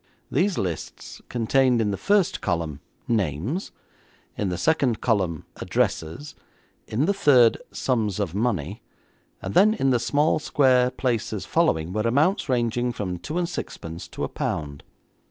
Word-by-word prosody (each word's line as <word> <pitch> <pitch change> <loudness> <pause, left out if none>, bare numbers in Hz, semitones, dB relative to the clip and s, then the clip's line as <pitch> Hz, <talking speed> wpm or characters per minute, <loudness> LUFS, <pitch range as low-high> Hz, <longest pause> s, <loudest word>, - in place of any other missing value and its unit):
These 190 +1 +1
lists 90 -4 -5
contained 125 +1 +2
in 105 -2 +1
the - - -1
first 200 - +1
column, 80 -5 -2 0.3
names; 110 - -1 0.6
in 100 - -1
the 90 - -2
second 135 - +1
column, 95 -9 0
addresses; 120 - -2 0.5
in 125 +8 0
the 200 - +2
third, 130 - +5
sums 110 -6 -1
of 95 -5 -2
money; 100 -4 -1 0.6
and 95 - -4
then 215 - +5
in 135 -9 +1
the 125 - +3
small, 150 +5 +2
square 130 -4 +3
places 125 -3 -2
following 80 +2 +1
were 110 - 0
amounts 145 - +1
ranging 120 0 +1
from 90 -6 -4
two 155 - -5
and 175 -1 0
sixpence 80 - -6
to - - -6
a - - 0
pound. 70 -2 -4
115 Hz, 145 wpm, -24 LUFS, 95-140 Hz, 0.6 s, third